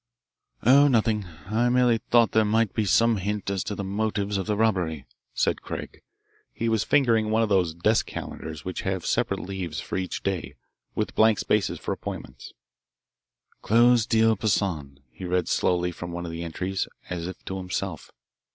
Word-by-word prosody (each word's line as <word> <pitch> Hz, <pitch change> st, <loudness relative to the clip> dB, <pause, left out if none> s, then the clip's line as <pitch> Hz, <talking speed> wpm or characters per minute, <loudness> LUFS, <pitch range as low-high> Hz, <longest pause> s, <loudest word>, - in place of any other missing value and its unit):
"Oh, 140 Hz, +4 st, +7 dB
nothing. 110 Hz, -5 st, +2 dB, 0.2 s
I 115 Hz, +4 st, +1 dB
merely 125 Hz, -2 st, +3 dB
thought 115 Hz, 0 st, +3 dB
there 110 Hz, -, +4 dB
might 110 Hz, 0 st, +1 dB
be 110 Hz, -, 0 dB
some 115 Hz, +4 st, +4 dB
hint 100 Hz, +1 st, -2 dB
as 95 Hz, -2 st, -1 dB
to 105 Hz, -, -3 dB
the 100 Hz, -, -4 dB
motives 100 Hz, +1 st, -1 dB
of 95 Hz, -, -3 dB
the 105 Hz, -, +1 dB
robbery," 90 Hz, -10 st, 0 dB, 0.3 s
said -, -, +1 dB
Craig. -, -, -7 dB, 0.5 s
He 115 Hz, -, -3 dB
was 110 Hz, -2 st, +2 dB
fingering 115 Hz, -6 st, +3 dB
one 110 Hz, +1 st, +3 dB
of 110 Hz, -, -1 dB
those 90 Hz, -5 st, +2 dB
desk 105 Hz, +6 st, +2 dB
calendars 80 Hz, +2 st, -7 dB
which 90 Hz, -, -4 dB
have 95 Hz, -2 st, -2 dB
separate -, -, 0 dB
leaves 90 Hz, -6 st, -5 dB
for -, -, -4 dB
each 95 Hz, -, -4 dB
day 95 Hz, -2 st, -3 dB, 0.4 s
with -, -, -2 dB
blank 110 Hz, -1 st, +4 dB
spaces 105 Hz, -2 st, 0 dB
for -, -, -4 dB
appointments. -, -, -7 dB, 1.1 s
"'Close 120 Hz, +1 st, +4 dB
deal 110 Hz, -1 st, +4 dB
Poissan,'" 85 Hz, -10 st, -1 dB
he -, -, -11 dB
read 90 Hz, -1 st, 0 dB
slowly 90 Hz, 0 st, +1 dB
from 85 Hz, 0 st, -7 dB
one 85 Hz, 0 st, -5 dB
of 85 Hz, -, -5 dB
the 85 Hz, 0 st, -5 dB
entries, 90 Hz, +3 st, -3 dB, 0.2 s
as 85 Hz, -1 st, -3 dB
if 95 Hz, -, -9 dB
to 95 Hz, -, -4 dB
himself. 90 Hz, -2 st, -4 dB
100 Hz, 175 wpm, -26 LUFS, 90-110 Hz, 1.1 s, Oh